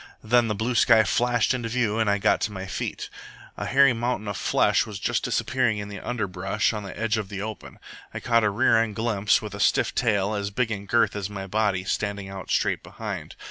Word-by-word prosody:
Then 120 +1 +3
the 105 - -1
blue 115 +4 -1
sky 115 -1 +5
flashed 120 +3 +1
into 120 -3 -3
view 115 -2 0
and 110 -2 +2
I 100 - +2
got 100 - +2
to 110 - -1
my 95 -2 -6
feet. 95 - -4 0.5
A - - -4
hairy 135 -1 +5
mountain 120 -2 -2
of 100 - -3
flesh - - +2
was 105 -2 -6
just - - -1
disappearing 125 -3 0
in 105 0 -5
the 100 -2 -7
underbrush 100 -2 -1
on 105 - -4
the 100 0 -8
edge 110 0 0
of 100 -3 -5
the 100 0 -5
open. 110 -1 -8 0.3
I - - -5
caught 115 -1 +2
a 105 - +3
rear 115 +2 +3
end 110 -3 -2
glimpse, 110 -2 +1
with 105 -2 -6
a 100 - -7
stiff - - +2
tail, 105 -3 +1
as 100 -1 -2
big 115 +3 -1
in 100 -1 -5
girth 110 0 +2
as 100 -1 -3
my 100 -2 -6
body, 100 -2 0
standing 100 -1 -3
out 95 -2 -8
straight - - +1
behind. - - -7
105 Hz, 225 wpm, -25 LUFS, 100-115 Hz, 0.5 s, sky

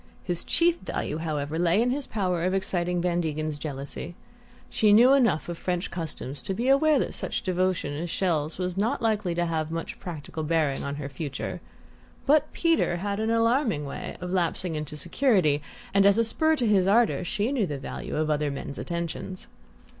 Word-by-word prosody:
His 175 -2 0
chief 340 0 +3
value, 155 - -3
however, 155 -1 -2
lay 175 +3 +3
in 245 +2 +2
his 280 +1 -2
power 180 -5 -1
of 185 +1 +1
exciting 180 -2 0
Van 175 0 +1
Degen's 155 -2 -2
jealousy. 145 +3 -5 0.5
She 215 -1 +3
knew 245 +5 +7
enough 235 - +3
of 175 -1 -5
French 180 0 -2
customs 155 -5 -5
to 195 - -3
be 240 +6 0
aware 300 +2 +5
that - - -1
such - - -3
devotion 185 -5 0
as 170 +4 -4
Chelles' 160 -4 -1
was 180 0 -2
not 230 +5 0
likely 210 -6 +1
to 175 0 +1
have 160 -2 -1
much 165 0 -5
practical 160 -3 -6
bearing 155 -3 0
on 140 0 -3
her 145 -1 -5
future; 140 0 -5 0.6
but 300 +1 +4
Peter 330 - +2
had 200 +3 -2
an 220 +1 0
alarming 230 - +2
way 140 - -6
of 180 0 -5
lapsing 180 -1 0
into 150 -1 -4
security, 175 - +2 0.3
and 195 0 +5
as 200 +1 +5
a 230 - +3
spur 315 +8 +2
to 250 - -1
his 195 -4 +3
ardour 220 -1 +3
she 205 +7 -1
knew 240 -9 +1
the 145 - -3
value 135 - -6
of 155 0 0
other 150 0 +1
men's 140 0 -6
attentions. 170 +2 -4
180 Hz, 190 wpm, -26 LUFS, 155-215 Hz, 0.6 s, knew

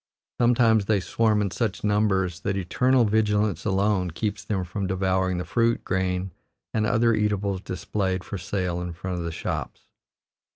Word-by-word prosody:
Sometimes 115 -3 +4
they 105 0 +2
swarm 105 +2 +1
in 100 - -2
such 110 -3 -2
numbers 95 -4 +1
that 100 -1 -2
eternal 125 +7 +2
vigilance 105 -3 +1
alone 95 -2 +1
keeps 105 +4 -3
them 100 -3 -1
from 95 +2 -3
devouring 95 -1 0
the 90 - -3
fruit, 115 0 +1
grain, 95 0 -1 0.4
and 110 -1 +1
other 115 0 +3
eatables 100 -3 0
displayed 95 0 -2
for 100 - -6
sale 90 -1 -2
in 90 -1 -4
front 90 +1 -4
of - - -3
the 85 - -3
shops. - - -4
100 Hz, 160 wpm, -25 LUFS, 95-110 Hz, 0.4 s, Sometimes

